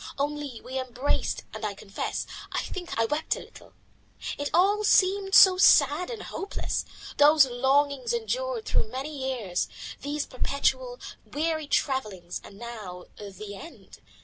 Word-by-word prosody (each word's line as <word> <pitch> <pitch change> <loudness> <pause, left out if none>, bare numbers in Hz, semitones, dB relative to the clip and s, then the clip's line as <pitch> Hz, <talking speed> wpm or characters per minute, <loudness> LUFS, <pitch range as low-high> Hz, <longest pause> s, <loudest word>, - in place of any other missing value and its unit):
Only 290 -4 -3
we 260 +1 -4
embraced, 255 +2 -1
and 220 0 -7
I 210 -2 -2
confess, 195 +1 -4 0.3
I - - 0
think 355 -7 -6
I 225 - +4
wept 295 +7 0
a - - -7
little. - - -14 0.6
It 285 0 -3
all 400 +5 +3
seemed 390 -1 +3
so 370 -1 +9
sad 295 0 +5
and 460 -4 -6
hopeless, 395 - -3 0.3
these 295 0 +7
longings 270 - +1
endured 485 0 -2
through - - +1
many 270 +5 -5
years, 255 -9 -2 0.3
these 290 +1 -2
perpetual, - - -1 0.2
weary 315 0 -2
travellings, 210 - -1
and 195 - -13
now 210 -6 -8
the 205 0 -8
end. 195 - -12
285 Hz, 140 wpm, -27 LUFS, 235-355 Hz, 0.6 s, so